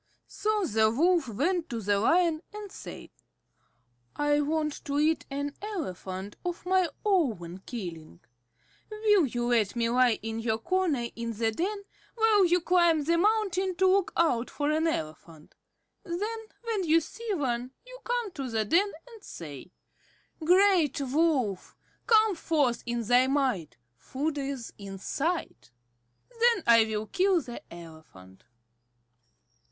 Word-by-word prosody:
So 420 Hz, 0 st, -1 dB
the 220 Hz, -6 st, +3 dB
Wolf 330 Hz, +5 st, +2 dB
went 320 Hz, -, -1 dB
to 235 Hz, -, -3 dB
the 205 Hz, -1 st, +1 dB
Lion, 330 Hz, -, +2 dB
and 420 Hz, -2 st, -8 dB
said: -, -, -10 dB, 1.0 s
"I 295 Hz, 0 st, +2 dB
want 305 Hz, 0 st, -2 dB
to 285 Hz, 0 st, -2 dB
eat 310 Hz, +2 st, +1 dB
an 285 Hz, +1 st, -3 dB
elephant 200 Hz, -, -5 dB
of 350 Hz, 0 st, -4 dB
my 370 Hz, -1 st, +2 dB, 0.2 s
own 225 Hz, -, 0 dB
killing. 165 Hz, -, -7 dB, 0.7 s
Will 425 Hz, -6 st, +3 dB
you 240 Hz, 0 st, -3 dB
let 225 Hz, -4 st, +2 dB
me 230 Hz, -1 st, +1 dB
lie 245 Hz, -1 st, +3 dB
in 225 Hz, 0 st, -4 dB
your 225 Hz, -1 st, 0 dB
corner 335 Hz, -3 st, 0 dB
in 230 Hz, 0 st, -4 dB
the 225 Hz, +1 st, 0 dB
den, 400 Hz, -, -3 dB, 0.3 s
while 440 Hz, -4 st, +4 dB
you 350 Hz, +1 st, +2 dB
climb 345 Hz, -3 st, +3 dB
the 335 Hz, +3 st, +2 dB
mountain 385 Hz, -2 st, +1 dB
to 380 Hz, +2 st, +2 dB
look 380 Hz, 0 st, +3 dB
out 255 Hz, -8 st, +2 dB
for 290 Hz, 0 st, -1 dB
an 315 Hz, +2 st, +1 dB
elephant? 160 Hz, -, -5 dB, 0.5 s
Then 425 Hz, +5 st, -4 dB, 0.2 s
when 445 Hz, -4 st, -1 dB
you 325 Hz, +1 st, +5 dB
see 425 Hz, +6 st, -5 dB
one, 250 Hz, -5 st, -2 dB, 0.2 s
you -, -, -12 dB
come 480 Hz, -4 st, -2 dB
to 275 Hz, -7 st, -5 dB
the 220 Hz, -2 st, 0 dB
den 385 Hz, -, +2 dB, 0.2 s
and 455 Hz, -4 st, -14 dB
say, 150 Hz, 0 st, -9 dB, 0.7 s
'Great 360 Hz, -4 st, +4 dB
Wolf, 270 Hz, -, 0 dB, 0.3 s
come 440 Hz, -2 st, +5 dB
forth 295 Hz, -8 st, 0 dB
in 240 Hz, 0 st, -1 dB
thy 245 Hz, +3 st, +4 dB
might. 255 Hz, -, -1 dB, 0.2 s
Food 290 Hz, -, -3 dB
is 270 Hz, -4 st, -5 dB
in 195 Hz, -1 st, -7 dB
sight.' 325 Hz, -, -3 dB, 0.6 s
Then 470 Hz, -5 st, +2 dB
I 230 Hz, -1 st, +6 dB
will 215 Hz, -1 st, -3 dB
kill 370 Hz, -, +2 dB
the 245 Hz, -6 st, -8 dB
elephant." 160 Hz, -, -14 dB
295 Hz, 140 wpm, -28 LUFS, 230-370 Hz, 1.0 s, I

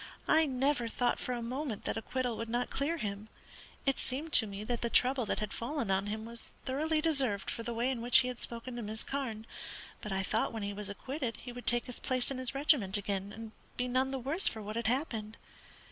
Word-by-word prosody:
I 320 Hz, 0 st, +5 dB
never 265 Hz, -2 st, +1 dB
thought 245 Hz, +1 st, +1 dB
for 250 Hz, -, -2 dB
a 240 Hz, -1 st, -3 dB
moment 250 Hz, -1 st, -3 dB
that -, -, 0 dB
acquittal 245 Hz, +1 st, -1 dB
would 230 Hz, 0 st, -4 dB
not 240 Hz, +2 st, 0 dB
clear 300 Hz, +5 st, 0 dB
him. 205 Hz, -3 st, -3 dB, 0.6 s
It 275 Hz, -1 st, +2 dB
seemed 295 Hz, +5 st, -3 dB
to 220 Hz, -, +7 dB
me 200 Hz, +1 st, -5 dB
that 235 Hz, +2 st, -2 dB
the 235 Hz, -, +1 dB
trouble 255 Hz, -1 st, +4 dB
that -, -, 0 dB
had 210 Hz, -1 st, -2 dB
fallen 240 Hz, -3 st, -1 dB
on 190 Hz, +1 st, +2 dB
him 215 Hz, +1 st, -3 dB
was 235 Hz, 0 st, -4 dB, 0.2 s
thoroughly 305 Hz, +4 st, +1 dB
deserved 270 Hz, -11 st, +2 dB
for -, -, -4 dB
the 235 Hz, +1 st, -3 dB
way 235 Hz, +3 st, +1 dB
in 245 Hz, -3 st, -3 dB
which 240 Hz, +2 st, +8 dB
he 250 Hz, -, -1 dB
had 250 Hz, -1 st, -4 dB
spoken 235 Hz, +1 st, -4 dB
to -, -, -3 dB
Miss 220 Hz, +1 st, -3 dB
Carne; 240 Hz, -6 st, -3 dB, 0.6 s
but 210 Hz, -, -5 dB
I 190 Hz, 0 st, +1 dB
thought 220 Hz, +4 st, +1 dB
when 220 Hz, -2 st, -3 dB
he 200 Hz, 0 st, -2 dB
was 205 Hz, 0 st, -1 dB
acquitted 255 Hz, +3 st, -3 dB
he 245 Hz, -, -6 dB
would 245 Hz, 0 st, -9 dB
take 240 Hz, 0 st, +2 dB
his 250 Hz, -, -6 dB
place 255 Hz, 0 st, 0 dB
in 265 Hz, -, -3 dB
his 255 Hz, +1 st, -2 dB
regiment 265 Hz, -9 st, +4 dB
again, 200 Hz, -1 st, -2 dB
and 220 Hz, +1 st, -7 dB, 0.3 s
be 250 Hz, -, 0 dB
none 255 Hz, +2 st, +2 dB
the 270 Hz, -, -2 dB
worse 280 Hz, +9 st, +2 dB
for 220 Hz, -1 st, -1 dB
what 210 Hz, +1 st, -5 dB
had 230 Hz, -1 st, 0 dB
happened. 230 Hz, -4 st, -1 dB
240 Hz, 235 wpm, -33 LUFS, 215-265 Hz, 0.6 s, which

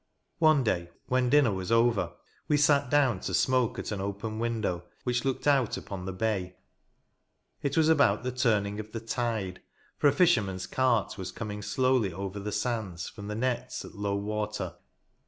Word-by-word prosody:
One 155 Hz, -4 st, +5 dB
day, 85 Hz, -6 st, 0 dB, 0.2 s
when 125 Hz, -1 st, +2 dB
dinner 145 Hz, -4 st, +5 dB
was 95 Hz, +2 st, -4 dB
over, 115 Hz, -2 st, +3 dB, 0.3 s
we 150 Hz, -, +3 dB
sat 140 Hz, -2 st, +3 dB
down 135 Hz, -8 st, +3 dB
to 95 Hz, -, -2 dB
smoke 130 Hz, +2 st, +2 dB
at -, -, -4 dB
an 100 Hz, -2 st, -3 dB
open 100 Hz, +3 st, -4 dB
window, 110 Hz, -7 st, -1 dB, 0.2 s
which 125 Hz, -1 st, 0 dB
looked 135 Hz, -1 st, -2 dB
out 140 Hz, -5 st, +3 dB
upon 95 Hz, -2 st, -6 dB
the 95 Hz, -, -3 dB
bay. 95 Hz, -2 st, -2 dB, 1.1 s
It 140 Hz, +1 st, -1 dB
was 160 Hz, -1 st, +5 dB
about 160 Hz, -5 st, +4 dB
the 125 Hz, -, -1 dB
turning 105 Hz, -5 st, +1 dB
of 110 Hz, 0 st, -8 dB
the 115 Hz, -, -3 dB
tide, 115 Hz, -5 st, -2 dB, 0.4 s
for -, -, +5 dB
a -, -, +6 dB
fisherman's 105 Hz, -, +2 dB
cart 120 Hz, -5 st, +1 dB
was 95 Hz, -1 st, -4 dB
coming 105 Hz, -2 st, -5 dB
slowly 125 Hz, 0 st, +1 dB
over 100 Hz, +3 st, -5 dB
the 105 Hz, +1 st, -4 dB
sands, 105 Hz, -6 st, -2 dB
from 105 Hz, -1 st, -9 dB
the 105 Hz, -, -3 dB
nets 125 Hz, +1 st, -2 dB
at -, -, -11 dB
low 100 Hz, -1 st, -2 dB
water. 105 Hz, -3 st, -3 dB
110 Hz, 175 wpm, -29 LUFS, 100-130 Hz, 1.1 s, a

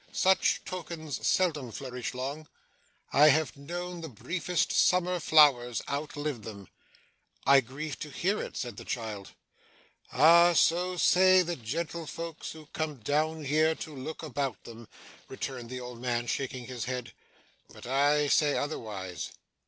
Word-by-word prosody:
Such 190 Hz, 0 st, +2 dB
tokens 165 Hz, -5 st, -5 dB
seldom 155 Hz, -, +1 dB
flourish 125 Hz, +2 st, -5 dB
long. 140 Hz, +5 st, -5 dB, 0.7 s
I 150 Hz, +2 st, +7 dB
have 155 Hz, +1 st, +2 dB
known 175 Hz, +5 st, -6 dB
the 160 Hz, -, -6 dB
briefest 170 Hz, -, -2 dB
summer 180 Hz, 0 st, +3 dB
flowers 140 Hz, -7 st, +4 dB
outlive 145 Hz, -2 st, -3 dB
them.' 100 Hz, -3 st, -9 dB, 0.8 s
'I 140 Hz, 0 st, +7 dB
grieve 135 Hz, +4 st, -6 dB
to 150 Hz, -, -6 dB
hear 190 Hz, +8 st, -1 dB
it,' -, -, -7 dB
said 120 Hz, -4 st, -5 dB
the -, -, -8 dB
child. 110 Hz, -4 st, -5 dB, 0.8 s
'Ah! 170 Hz, +5 st, +6 dB
so 180 Hz, +2 st, +2 dB
say 185 Hz, +2 st, +5 dB
the 175 Hz, 0 st, -3 dB
gentlefolks 165 Hz, +5 st, -5 dB
who 160 Hz, -1 st, -12 dB
come 155 Hz, -2 st, -2 dB
down 155 Hz, +6 st, -1 dB
here 155 Hz, +3 st, +2 dB
to 155 Hz, -2 st, -8 dB
look 145 Hz, +5 st, -7 dB
about 140 Hz, -4 st, -3 dB
them,' 115 Hz, -1 st, -11 dB, 0.4 s
returned 130 Hz, -3 st, -6 dB
the 130 Hz, 0 st, -5 dB
old 125 Hz, -1 st, -9 dB
man, 120 Hz, -1 st, -1 dB
shaking 130 Hz, 0 st, -3 dB
his 125 Hz, -2 st, -5 dB
head, 125 Hz, -1 st, -5 dB, 0.6 s
'but -, -, -12 dB
I 145 Hz, +3 st, +3 dB
say 145 Hz, 0 st, +3 dB
otherwise. 100 Hz, -, -4 dB
145 Hz, 140 wpm, -29 LUFS, 125-160 Hz, 0.8 s, I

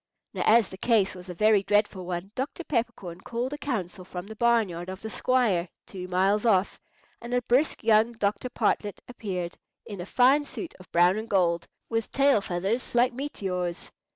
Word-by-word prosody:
Now -, -, -3 dB
as 225 Hz, -1 st, +5 dB
the 190 Hz, -, -10 dB
case 215 Hz, -4 st, +2 dB
was 180 Hz, 0 st, -11 dB
a 180 Hz, -, -6 dB
very 210 Hz, +2 st, +4 dB
dreadful 205 Hz, -2 st, 0 dB
one, 180 Hz, +2 st, -4 dB
Dr. 275 Hz, +8 st, -4 dB
Peppercorn 195 Hz, -, -3 dB
called 245 Hz, +5 st, -3 dB
a -, -, -4 dB
council 190 Hz, -9 st, -3 dB
from 180 Hz, 0 st, -7 dB
the 220 Hz, +2 st, -9 dB
barn 235 Hz, -1 st, +3 dB
yard 175 Hz, +1 st, -7 dB
of 190 Hz, 0 st, -6 dB
the 220 Hz, -, -5 dB
squire, 215 Hz, -11 st, +1 dB, 0.2 s
two 185 Hz, -2 st, -7 dB
miles 190 Hz, +3 st, +2 dB
off, 200 Hz, -4 st, +2 dB, 0.4 s
and 240 Hz, +1 st, -3 dB
a 245 Hz, -, +2 dB
brisk 260 Hz, +7 st, +1 dB
young 220 Hz, +1 st, +4 dB
Dr. 220 Hz, +2 st, -1 dB
Partlett 210 Hz, -3 st, 0 dB
appeared, 185 Hz, -8 st, -5 dB, 0.3 s
in 200 Hz, -4 st, -7 dB
a 175 Hz, -, -7 dB
fine 265 Hz, +6 st, +4 dB
suit 325 Hz, +4 st, -7 dB
of 185 Hz, -, -16 dB
brown 175 Hz, +3 st, +4 dB
and 220 Hz, +1 st, -5 dB
gold, 170 Hz, -3 st, +1 dB, 0.2 s
with 225 Hz, -1 st, -2 dB
tail 275 Hz, -5 st, +4 dB
feathers 195 Hz, +8 st, -2 dB
like 245 Hz, +1 st, +4 dB
meteors. 185 Hz, -10 st, -4 dB
210 Hz, 185 wpm, -27 LUFS, 185-235 Hz, 0.4 s, as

